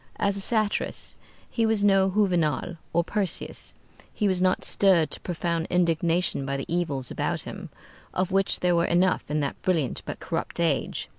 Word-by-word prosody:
As 200 -1 +1
a 200 - -2
satirist 215 0 0 0.3
he 230 - -1
was 220 -2 +2
no 195 -1 +4
Juvenal 175 -5 +1
or 170 +1 +2
Persius. 195 +1 -2 0.4
He 210 - 0
was 185 -2 +1
not 185 0 +2
stirred 185 -6 +4
to - - -3
profound 170 -1 -2
indignation 170 -2 +1
by 135 0 -2
the 135 - -4
evils 155 -7 -2
about - - -1
him, - - -8 0.4
of 185 +1 -1
which 195 0 +1
there 180 -1 +3
were 170 0 +3
enough 180 -1 +2
in 150 0 0
that 140 - -3
brilliant 165 -9 0
but - - -5
corrupt - - -4
age. - - 0
180 Hz, 170 wpm, -26 LUFS, 165-195 Hz, 0.4 s, no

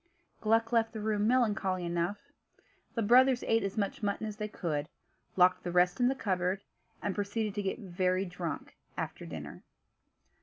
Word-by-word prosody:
Gluck 225 +1 +2
left 230 -1 +2
the 220 - -4
room 210 0 +1
melancholy 210 -7 +2
enough. 170 +3 -1 0.8
The 230 - +1
brothers 250 +3 +5
ate 225 0 +2
as 195 +1 -3
much 200 +1 -1
mutton 205 +1 -1
as 210 -1 -5
they 210 - -2
could, 155 -7 -3 0.5
locked 180 0 +4
the 175 - -3
rest 180 +3 +3
in 245 - +4
the 265 - +2
cupboard 190 -3 -1 0.4
and 200 - 0
proceeded 210 +1 -2
to 205 - -2
get 195 -1 -2
very 185 -2 0
drunk 175 -4 -5 0.2
after - - -4
dinner. - - -7
205 Hz, 165 wpm, -31 LUFS, 180-225 Hz, 0.8 s, brothers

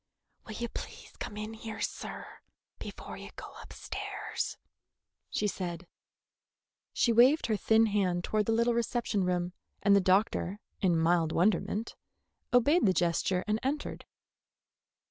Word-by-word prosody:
"Will 215 - -6
you 235 +1 -2
please - - -8
come 210 - -5
in 215 +1 -5
here, 225 0 -7
sir, - - -4 0.5
before - - -8
you - - -9
go - - -9
upstairs?" - - -5 0.7
she - - -1
said. 180 -3 -3 1.1
She 235 - +2
waved 255 +7 +6
her 220 - +1
thin 220 +3 +4
hand 190 -5 +1
toward 215 +1 0
the - - +2
little 235 +1 +3
reception 235 -4 0
room, 180 0 -1 0.3
and 200 0 +6
the 200 - +5
doctor, 190 +1 +2 0.2
in 175 -4 +3
mild 165 0 +3
wonderment, 200 +5 +1 0.6
obeyed 275 - +4
the 185 - +4
gesture 175 +2 +1
and 215 +1 +1
entered. 290 +3 -3
210 Hz, 135 wpm, -30 LUFS, 180-230 Hz, 1.1 s, waved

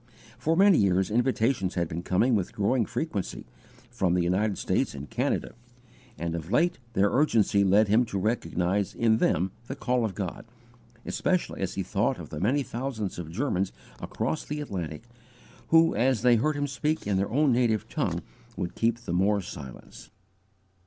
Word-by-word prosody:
For 165 +1 +1
many 195 -2 +6
years 95 -1 +2
invitations 115 -4 +1
had 85 -2 0
been 80 +2 -4
coming 105 +8 +2
with 100 -5 0
growing 110 +3 +1
frequency, 110 - -4 0.5
from 90 -2 +1
the 90 - +2
United 95 +4 +1
States - - 0
and 70 +2 -7
Canada; - - -1 0.6
and 85 0 -3
of 85 0 -5
late 170 +7 +2
their 100 -1 +3
urgency 115 -8 +3
led 100 +3 +4
him 110 +4 +4
to 100 - -4
recognize 95 -2 -1
in 115 -1 +3
them 95 -4 +1 0.2
the 135 - -4
call 125 -3 0
of 110 -4 -2
God, 95 0 -5 0.6
especially - - -1
as - - -2
he - - -1
thought - - 0
of - - -9
the 75 - -5
many 130 - +1
thousands 115 -6 -4
of 80 -2 -6
Germans 95 - -1 0.3
across 125 +8 -3
the 150 +1 -5
Atlantic, 90 - -5 0.6
who 165 0 +5
as 125 -2 +1
they 120 -2 +6
heard 150 +7 +1
him 145 0 -1
speak 150 +3 -2
in 100 -1 +1
their 100 +1 0
own 140 +4 +3
native 115 -4 +1
tongue - - -2 0.3
would 85 - -3
keep 115 0 +1
the 85 - -4
more 100 +3 +2
silence. 65 -8 -10
105 Hz, 175 wpm, -27 LUFS, 90-130 Hz, 0.6 s, many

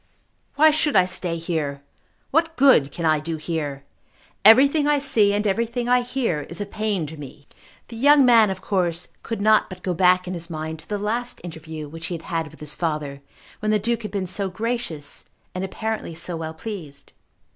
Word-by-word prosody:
Why 310 +2 +6
should 305 -2 +1
I 185 -2 +6
stay 180 -2 -3
here? 155 -4 -3 0.5
What 325 +2 +1
good 255 - +5
can 170 +3 -4
I 155 -1 +3
do 160 +2 -4
here? 150 -3 -4 0.6
Everything 275 +8 +6
I 295 0 +4
see 225 -8 +2
and 205 +1 0
everything 235 +4 -1
I 250 0 +4
hear 240 - -1
is 170 - -6
a 205 - -2
pain 205 -4 -2
to 155 +2 -9
me." 140 0 -11 0.4
The 235 - -9
young 285 +2 +6
man 230 -4 +6
of 190 -1 -4
course 180 -3 -1
could 230 - -4
not 215 +1 +4
but 185 -1 -10
go 180 - -1
back 180 +1 +3
in 185 - -3
his 170 -1 -6
mind 160 0 -5
to 155 - -14
the 210 - -1
last 235 +4 -2
interview 160 -2 -7
which 160 +2 -7
he 175 - -3
had 165 - -8
had 165 -1 -2
with - - -18
his 150 -1 -3
father, 150 -4 -3 0.4
when 215 - -2
the 215 - +4
Duke 230 +3 -1
had 210 - -5
been 200 -2 -2
so 190 +2 -1
gracious 190 -8 -4 0.3
and 185 - -3
apparently 215 -3 -4
so 170 +1 -3
well 160 -1 -5
pleased. 160 -8 -8
185 Hz, 200 wpm, -23 LUFS, 160-225 Hz, 0.6 s, Why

